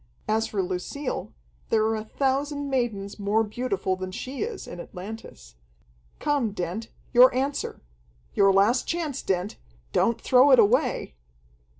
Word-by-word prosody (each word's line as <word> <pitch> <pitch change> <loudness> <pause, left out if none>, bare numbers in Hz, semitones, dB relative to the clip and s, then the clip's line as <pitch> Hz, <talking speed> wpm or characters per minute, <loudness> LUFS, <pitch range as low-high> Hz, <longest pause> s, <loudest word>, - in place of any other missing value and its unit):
As 220 +1 +1
for 195 -3 -1
Lucille, 185 +10 -4 0.4
there 220 -1 +3
are 220 0 +1
a 215 - -3
thousand 280 +4 -1
maidens 220 -6 -2
more 205 +2 +2
beautiful 210 -4 -2
than 185 0 -6
she 260 +8 -6
is, 435 -2 -4
in - - -8
Atlantis. 180 - -9 0.6
Come, 275 -8 0
Dent, 190 +4 -4 0.3
your 250 +1 +8
answer! 275 +2 -2 0.5
Your 195 0 +5
last 205 +6 +3
chance, 315 -5 -2
Dent! 190 +2 -2 0.4
Don't 230 0 +2
throw 255 +4 +5
it 260 - +8
away!" 245 - +2
225 Hz, 135 wpm, -26 LUFS, 195-265 Hz, 0.6 s, your